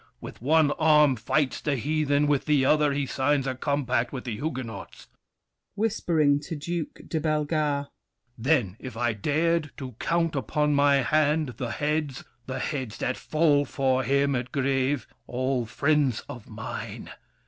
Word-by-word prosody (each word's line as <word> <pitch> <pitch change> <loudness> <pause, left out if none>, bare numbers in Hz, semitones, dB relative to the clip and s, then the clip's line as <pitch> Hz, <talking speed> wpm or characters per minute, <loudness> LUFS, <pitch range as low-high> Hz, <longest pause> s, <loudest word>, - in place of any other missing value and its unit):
With - - -10
one 150 +2 +4
arm 150 -3 +5
fights 130 +5 0
the 145 - 0
heathen, 145 +2 +1
with 145 -2 +1
the 145 -3 +3
other 150 +1 +4
He 140 0 -1
signs 135 +1 0
a 135 - -1
compact 130 -3 -1
with 130 -3 -5
the 120 -4 -4
Huguenots. 115 - -6 0.7
[Whispering 170 -9 +2
to 160 +3 -6
Duke 165 +2 -4
de 160 - -1
Bellegarde. 150 -2 0 0.5
Then, 120 - +1
if 130 -3 -8
I 120 -1 +1
dared 155 +8 0
to 130 -2 -6
count 165 -2 0
upon 150 +2 0
my 140 -1 +4
hand 150 +3 +2
The 120 - -3
heads—the 135 -3 -3
heads 130 -7 -3
that 130 - -1
fall 155 -2 +2
for 130 -2 0
him 140 +2 +1
at 125 0 -3
Grève! 135 -1 0 0.2
All 130 -1 -1
friends 140 -1 +1
of 120 -4 -9
mine! 110 0 -7
140 Hz, 150 wpm, -26 LUFS, 130-150 Hz, 0.7 s, arm